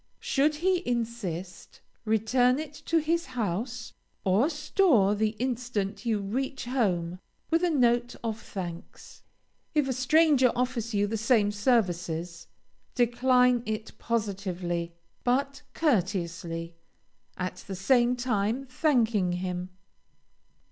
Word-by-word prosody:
Should 295 +2 +1
he 360 +3 +1
insist, 225 - -4 0.3
return 245 +4 +3
it 305 -1 -5
to 330 - +3
his 330 +2 0
house 225 +4 -3 0.3
or 200 - +3
store 300 - +3
the 215 +1 0
instant 240 -4 -2
you 220 -2 +2
reach 250 +7 -3
home, 185 -9 0 0.3
with 330 +2 +3
a 355 - +3
note 240 -5 +2
of 225 -1 -3
thanks. 175 -3 -8 0.5
If 295 -3 +3
a 260 - 0
stranger 265 0 +4
offers 240 -3 -1
you 205 0 +3
the 220 +2 -2
same 220 -2 +3
services, 175 -7 0 0.5
decline 250 0 +3
it 220 0 -4
positively, 185 -6 -2 0.3
but 275 +2 0
courteously, 175 - -1 0.6
at 180 0 -3
the 190 - -7
same 240 +5 +3
time 240 0 -1
thanking 235 - +1
him. 180 0 -3
230 Hz, 115 wpm, -28 LUFS, 195-255 Hz, 0.6 s, stranger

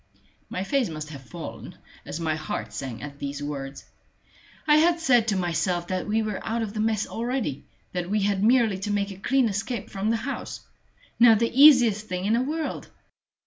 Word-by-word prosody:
My 185 - -3
face 260 +1 0
must 155 -1 -6
have 140 -3 -9
fallen, 125 - -9 0.3
as 155 - -5
my 160 -2 0
heart 150 -9 -5
sank 125 +2 -6
at 145 -1 -8
these 140 +1 -4
words. 140 -1 -6 0.8
I 300 -1 +5
had 335 +2 +4
said 245 -8 +3
to 210 - +1
myself 175 0 -1
that 185 -1 -2
we 220 +1 +1
were 210 -3 -4
out 225 +1 -1
of 210 -2 -5
the 215 - -4
mess 215 -1 +1
already 235 - -3 0.2
that 180 -1 -3
we 210 +1 +1
had 200 -1 +1
merely 225 -4 +3
to 205 +2 -3
make 200 0 -1
a 190 - -9
clean 255 +5 +2
escape 215 +2 -3
from 195 +2 -2
the 230 - +2
house 265 +5 -5 0.6
now 235 -1 +8
the 230 +2 0
easiest 245 -7 +6
thing 180 -1 -3
in 210 - +2
the 235 - +3
world. 310 +4 -3
205 Hz, 195 wpm, -25 LUFS, 170-235 Hz, 0.8 s, now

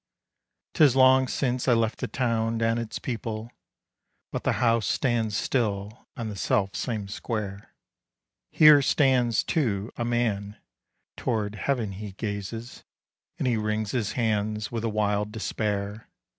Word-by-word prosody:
'Tis 145 -6 +5
long 130 0 +6
since 125 -1 -1
I 125 - +5
left 115 0 0
the - - -2
town 115 -2 0
and 115 0 +1
its 115 -2 -4
people, 115 -2 -5 0.8
But - - -4
the - - +2
house 115 -3 +2
stands 115 -5 0
still 105 -3 -2
on 115 - -3
the 105 - -5
self 95 0 0
same 110 -5 -3
square. 105 -1 -5 0.7
Here 150 -2 +7
stands, 130 -4 +3
too, 110 - -1
a 120 - -1
man; 110 -4 -1 0.6
toward 110 -4 -1
heaven 115 -1 -1
he 100 +1 -7
gazes, 110 +3 -5 0.5
And - - -1
he 120 -2 +2
wrings 105 -1 -1
his 115 -5 -1
hands 105 -3 -1
with 115 -1 -3
a 115 - 0
wild 105 -1 0
despair. 105 -1 -3
110 Hz, 140 wpm, -26 LUFS, 105-120 Hz, 0.8 s, Here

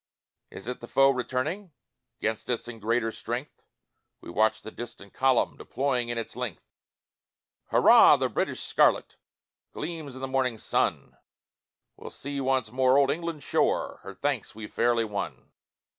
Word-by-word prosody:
Is 95 - -10
it 125 - -4
the 120 - -9
foe 135 +2 +5
returning, 135 - -3 0.5
'Gainst 110 +2 -2
us 120 -1 -1
in 115 -2 -8
greater 115 +1 0
strength? 120 +6 -6 0.5
We - - -10
watched 110 +3 +2
the 110 - -7
distant 120 -4 -9
column 130 -2 +2
Deploying 130 -3 -1
in 120 - -2
its 115 -2 -4
length: 120 -10 -5 1.0
Hurrah - - +7
the - - +1
British - - -2
scarlet - - +2 0.6
Gleams 155 -4 -5
in 130 - -9
the 135 - -2
morning 130 -3 0
sun - - -1 0.8
We'll - - -9
see 140 0 -5
once 130 -4 0
more 130 +1 +4
old 140 -1 +4
England's 165 -3 -4
shore, - - +1
Her - - -9
thanks - - -2
we've 110 -1 -9
fairly 120 -1 +2
won. 85 - -5
125 Hz, 150 wpm, -27 LUFS, 115-135 Hz, 1.0 s, Hurrah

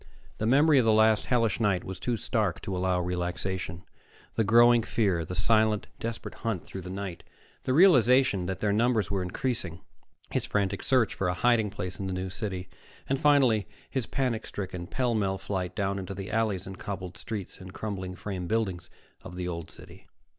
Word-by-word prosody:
The 110 - 0
memory 145 +3 +5
of 120 - +2
the 110 - +5
last 110 0 +4
hellish 115 -5 +2
night 100 -5 +1
was 95 -1 -7
too 120 -2 -1
stark 105 -7 -1
to 100 -3 -4
allow 90 0 +1
relaxation 90 0 -3 0.5
the 110 - +1
growing 120 +2 +6
fear, 100 -7 +1
the 90 +3 -6
silent, 110 +2 +3
desperate 115 0 -5
hunt 115 -7 -2
through 95 - -7
the 90 - -8
night; 95 -2 -5 0.4
the 130 - +1
realization 130 - +5
that 95 0 -4
their 105 -1 +2
numbers 115 -1 +2
were 100 -2 0
increasing; 90 -2 -2 0.5
his - - -1
frantic 100 -1 0
search 130 -5 +3
for 95 - -1
a 90 - 0
hiding 115 +1 +3
place 90 -3 -6
in 95 - -3
the 95 - -2
New 90 0 -3
City; 95 -1 -4 0.4
and 135 0 0
finally 130 -8 +4 0.2
his 130 -5 -2
panic 125 -5 -1
stricken, 90 -3 -5
pell 125 +2 0
mell 100 -3 0
flight 95 -2 -3
down 100 -1 -1
into 95 +1 -6
the 95 0 -6
alleys 110 -5 0
and 95 -1 -8
cobbled 95 -3 -5
streets 100 +1 -6
and 90 0 -10
crumbling 95 -3 -5
frame 90 -2 -5
buildings 100 -5 -1 0.3
of 90 - -10
the 90 0 -3
Old 85 -2 -5
City.... - - -14
100 Hz, 190 wpm, -28 LUFS, 90-115 Hz, 0.5 s, growing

